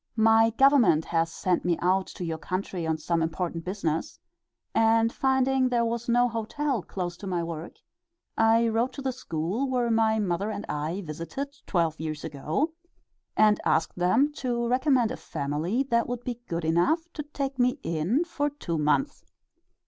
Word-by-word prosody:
My 225 0 +5
Government 230 - +4
has 165 -1 0
sent 180 0 0
me 175 -2 +1
out 185 +2 +1
to 180 - -6
your 160 -1 -3
country 185 -1 -3
on 160 0 0
some 165 +2 -1
important 165 +1 -2
business, 180 - -2 0.6
and 225 0 +3
finding 265 -1 +2
there 240 -1 +2
was 235 +1 -3
no 245 +1 +4
hotel 240 +3 -2
close 175 0 -5
to 200 - -8
my 175 -2 -1
work, 165 0 -6 0.6
I 225 +1 +4
wrote 230 +3 0
to 275 - -7
the 265 - 0
school 210 - -3
where 245 -2 +1
my 220 -1 +3
mother 200 0 -1
and 215 -1 -4
I 155 +6 -3
visited 170 - -6
twelve 165 -4 0
years 155 -1 -4
ago, 155 - -2 0.6
and 215 -1 +4
asked 160 - +1
them 230 +12 +2
to 240 -2 -1
recommend 255 -1 +2
a - - -4
family 155 - -2
that 235 0 +2
would 245 -1 -4
be 240 -1 -5
good 170 -1 -3
enough 175 - +2
to 300 - -4
take 275 -2 -4
me 250 0 +3
in 170 - 0
for 315 -4 -1
two 175 - -4
months. 150 - +1
220 Hz, 170 wpm, -27 LUFS, 170-250 Hz, 0.6 s, My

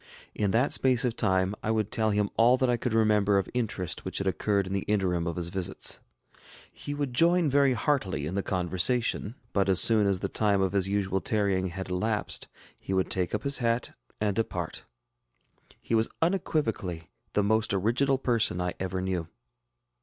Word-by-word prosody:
In 105 -2 0
that 120 +8 +2
space 130 -1 +3
of 120 -2 -1
time 95 -3 +1
I - - -3
would 110 -2 0
tell 110 -1 +1
him 105 -1 0
all 120 +3 +5
that 130 -1 +2
I - - +3
could 120 -1 -2
remember 105 -2 +3
of 95 - 0
interest 110 -8 -3
which - - -5
had 100 - -2
occurred 100 +2 0
in 95 - -5
the 100 - 0
interim 90 -5 0
of 85 - -3
his 85 -1 -3
visits. 95 0 -1 0.7
He 145 - -6
would 145 -3 -3
join 170 +2 +3
very 140 -1 +4
heartily 100 - -1
in 80 - -4
the 100 - 0
conversation; 95 +6 0 0.2
but 100 -1 +1
as 95 -1 +4
soon 110 -3 +5
as 95 -2 0
the 100 - -1
time 100 0 +1
of 95 -1 +1
his 95 -1 +1
usual 95 -1 0
tarrying 100 -3 0
had 95 +1 -6
elapsed, 105 +4 -2 0.3
he 95 - -3
would 95 - 0
take 90 +1 0
up 105 - -4
his 140 -1 +1
hat 115 0 0 0.3
and 105 -2 0
depart. 115 - -3 0.9
He - - -5
was 115 0 +3
unequivocally 115 - -1 0.2
the 105 - +2
most 110 +2 +1
original 120 +8 +1
person 115 -8 0
I 90 0 -2
ever 95 0 -3
knew. 90 -3 -2
105 Hz, 190 wpm, -28 LUFS, 95-115 Hz, 0.9 s, all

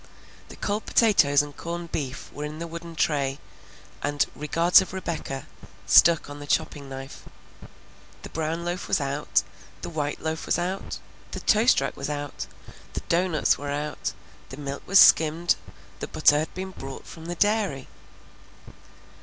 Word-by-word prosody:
The - - -10
cold 210 +1 -2
potatoes 150 -11 +4
and 145 -1 -9
corned 170 0 -5
beef 135 -3 -4
were 145 - -5
in 150 +1 -5
the 170 - -4
wooden 170 0 -8
tray, 140 -4 +1 0.6
and 145 0 +1
"Regards 165 +5 +5
of 190 - -6
Rebecca" 165 -7 -4 0.4
stuck 170 -2 +6
on 145 0 -8
the 145 - -9
chopping 140 -1 -1
knife. 135 0 -8 1.0
The - - -7
brown 165 +2 -2
loaf 175 +1 -3
was - - +2
out, 140 -4 0 0.4
the - - -5
white 150 -2 -2
loaf 160 0 -3
was - - +2
out, 180 +2 -3 0.4
the - - -4
toast 220 - +4
rack 135 - -2
was 140 - -4
out, 145 -9 -4 0.5
the - - -3
doughnuts 170 -2 +2
were 145 0 -5
out, 150 +1 -3 0.4
the 130 - -9
milk 140 -1 -5
was 195 - +5
skimmed, 165 0 +6 0.4
the - - -4
butter 145 - +4
had 155 - -3
been 190 +1 -5
brought 135 -6 -8
from 165 0 -10
the 175 - -3
dairy. 205 -9 +1
155 Hz, 160 wpm, -26 LUFS, 145-175 Hz, 1.0 s, stuck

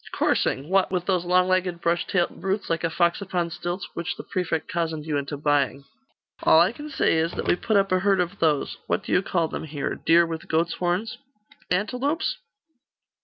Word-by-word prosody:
'Coursing? 135 +2 +1
What, 190 +1 +2
with 180 -2 -1
those 180 -3 +1
long 180 +1 +3
legged 185 -2 0
brush 170 +1 0
tailed 175 -2 -1
brutes, 195 -1 -2
like 165 - -1
a 165 - +1
fox 170 +3 +1
upon 180 -3 -2
stilts, 175 +2 -4
which 175 +1 -3
the - - -8
prefect 175 -3 -2
cozened 160 -3 -2
you 155 -2 -2
into 145 +1 -3
buying.' 140 -2 +1 0.6
'All 160 - +6
I 175 +3 +4
can 295 +5 -9
say 270 - +2
is, 165 +1 0
that - - -4
we - - +4
put 215 +3 +1
up 195 -1 +2
a 185 - +3
herd 195 0 +2
of 180 +3 -2
those 150 -4 +1
what - - 0
do - - -6
you 180 - +4
call 170 -4 0
them - - -5
here 145 -2 -3
deer 170 +1 +4
with 165 +2 -6
goats' 165 0 +1
horns?' 180 +5 -2 0.5
'Antelopes? 250 - 0
175 Hz, 205 wpm, -25 LUFS, 165-190 Hz, 0.6 s, All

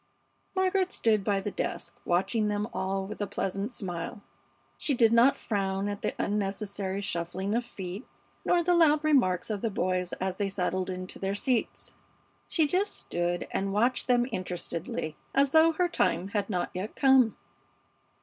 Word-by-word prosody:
Margaret 375 0 +2
stood 215 - +2
by 200 0 +1
the 205 - -3
desk, - - -4
watching 200 +5 +1
them 210 0 -1
all 190 0 -1
with 210 +2 -7
a 205 - 0
pleasant 195 +3 -2
smile. 185 -3 -5 0.5
She 285 - 0
did 230 -2 +4
not 240 +4 +6
frown 195 -2 -1
at 205 0 -4
the - - -2
unnecessary 200 -1 -2
shuffling 190 +1 -2
of 240 +2 +1
feet 190 +1 -7 0.4
nor 350 -1 +3
the 355 +1 +3
loud 310 -3 +5
remarks 245 - +2
of 205 -2 -2
the 230 - 0
boys 185 -2 -1
as 185 0 -3
they 200 -2 0
settled 185 -1 -1
into 185 0 -5
their 195 +1 -1
seats. 245 +2 -1 0.5
She 320 - +3
just 375 +7 0
stood 175 0 -2
and 195 0 -1
watched 240 +5 +2
them 245 -1 +4
interestedly, 180 -1 -3 0.2
as 275 0 +4
though 320 +1 +6
her 355 +3 +2
time 195 - 0
had 200 0 -1
not 180 -4 -1
yet 190 +4 -5
come. 265 -5 +5
205 Hz, 165 wpm, -29 LUFS, 190-245 Hz, 0.5 s, not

